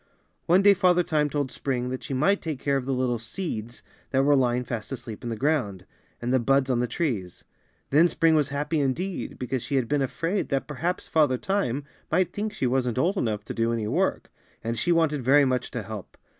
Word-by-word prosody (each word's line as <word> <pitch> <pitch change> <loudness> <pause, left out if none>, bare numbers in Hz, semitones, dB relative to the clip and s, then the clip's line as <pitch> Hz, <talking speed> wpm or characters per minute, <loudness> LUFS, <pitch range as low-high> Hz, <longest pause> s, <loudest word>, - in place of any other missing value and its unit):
One 180 +4 +5
day 205 0 +8
Father 180 -2 +3
Time 150 -4 +1
told 145 -3 -2
Spring 125 -2 -2
that 130 0 -4
she 135 - -4
might 195 +10 +2
take 155 -4 -3
care 140 0 0
of 135 -1 -2
the - - 0
little 125 -2 0
seeds 120 - -5 0.3
that 135 0 +2
were 145 +1 +5
lying 125 -2 +2
fast 120 -1 -5
asleep 120 -5 -7
in 120 - -3
the 115 - -2
ground, 110 - -1 0.3
and 120 +2 -1
the 130 - +4
buds 135 +2 +2
on 120 - +1
the 125 - +1
trees. 115 - -3 0.5
Then 155 +5 +6
Spring 165 -1 +2
was 150 -3 +2
happy 150 +3 -1
indeed, 170 +8 -2
because 125 0 -2
she 140 - -3
had 130 -3 +1
been 145 +1 +1
afraid 165 +8 -1
that 135 -1 0
perhaps 160 +5 -3
Father 150 -5 +3
Time 145 -7 -1 0.3
might 180 +1 +2
think 210 +1 -2
she 135 - -2
wasn't 125 -1 0
old 175 +9 +2
enough 105 - -1
to - - -5
do 115 0 0
any 115 -2 -1
work, - - 0 0.3
and 115 +1 -2
she 145 +10 0
wanted 160 -4 +2
very 140 +3 +5
much 125 -1 0
to 120 - -4
help. 105 -1 -8
135 Hz, 220 wpm, -26 LUFS, 120-160 Hz, 0.5 s, day